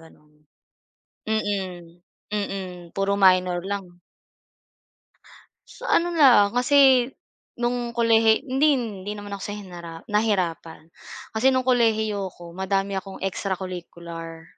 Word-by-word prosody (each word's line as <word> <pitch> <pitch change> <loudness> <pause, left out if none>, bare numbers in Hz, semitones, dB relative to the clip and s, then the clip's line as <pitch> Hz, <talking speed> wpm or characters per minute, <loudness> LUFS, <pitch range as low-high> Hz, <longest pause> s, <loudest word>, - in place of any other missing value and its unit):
ganun. 150 -2 -20 0.9
Mm. 185 -5 -3 0.3
Mm, 190 -4 -4
puro 195 0 0
minor 185 -2 +4
lang. 190 -3 -6 1.7
Sa - - -12
ano 345 +1 +3
lang, 240 -9 +6
kasi 260 -1 +5 0.5
nung 240 0 -1
kolehi 225 -1 +4
hindi, 280 +4 +3
hindi 210 -7 -3
naman 205 -1 -7
ako 195 - -11
sa 205 - -4
hinara 175 -4 -9
nahirapan. 180 -7 -1 0.5
Kasi 260 +4 +4
no'ng 260 -1 0
kolehiyo 220 -6 +1
ko 170 0 -12
madami 195 +1 -1
akong 190 0 -6
extracurricular. 170 -4 -5
200 Hz, 105 wpm, -24 LUFS, 180-225 Hz, 1.7 s, lang